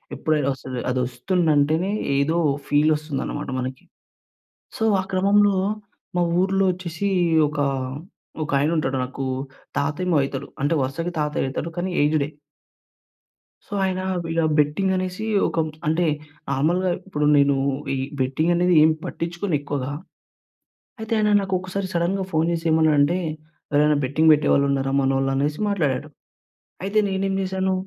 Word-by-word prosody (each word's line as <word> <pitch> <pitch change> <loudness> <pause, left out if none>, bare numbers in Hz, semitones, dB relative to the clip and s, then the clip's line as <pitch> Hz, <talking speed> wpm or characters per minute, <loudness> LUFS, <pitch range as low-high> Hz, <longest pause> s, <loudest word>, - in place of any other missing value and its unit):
ఏప్రిల్‌లో 150 -3 0
వస్తుంది. 130 -1 -6
అది 125 0 0
ఒస్తుందంటేనే 160 +2 +1 0.3
ఏదో 155 +4 +1 0.3
ఫీల్ 150 +2 +3
వస్తుందన్నమాట 150 -2 -4
మనకి. 130 0 -5 0.9
సో - - -2 0.2
ఆ - - -5
క్రమంలో 200 +1 +4 0.6
మా - - +3 0.2
ఊర్లో 195 +1 +2
వచ్చేసి 180 +1 -4 0.4
ఒక, 150 0 -5 0.8
ఒక 145 - -5
ఆయన 150 +3 +1
ఉంటాడు 135 -3 0
నాకు 135 +1 -5 0.5
తాతేమో 155 +4 0
అయితడు. 135 -1 -4
అంటే 145 +4 +1
వరుసకి 150 +7 -2
తాతయ్య 150 -2 -1
అయితడు 160 +5 -4
కానీ 185 +2 -1
ఏజ్డే. 150 -1 +1 1.4
సో - - -27
ఆయన 185 0 -1 0.3
ఇలా 165 -1 +1 0.2
బెట్టింగ్ 150 +7 +2
అనేసి 185 +3 -3 0.2
ఒక 165 - -2 0.3
అంటే 165 +2 +2 0.4
నార్మల్‌గా 175 +6 +1 0.2
ఇప్పుడు 150 -5 -1
నేను 140 0 +4 0.4
ఈ - - -2 0.2
బెట్టింగ్ 145 +6 +1
అనేది 180 0 +3
ఏం 160 - +5
పట్టించుకోను 175 0 -3
ఎక్కువగా. 145 -2 -3 1.1
అయితే 220 +1 -3
ఆయన 210 0 +2
నాకు 190 -1 -4
ఒకసారి 185 +1 -4
సడెన్‌గా 185 +3 0
ఫోన్ 160 +1 +1
చేసి 165 0 -4
ఏమన్నాడంటే, 155 +1 +3 0.5
"ఎవరైనా 150 0 +3
బెట్టింగ్ 155 +4 +4
పెట్టేవాళ్ళు 145 -1 +3
ఉన్నారా 135 0 0
మనోళ్ళు?" 135 0 +1
అనేసి 145 +2 -1
మాట్లాడాడు. 150 -6 -1 0.7
అయితే 205 +2 +1
నేనేం 195 0 -1
చేశాను 190 0 -1
160 Hz, 130 wpm, -23 LUFS, 145-185 Hz, 1.4 s, ఏం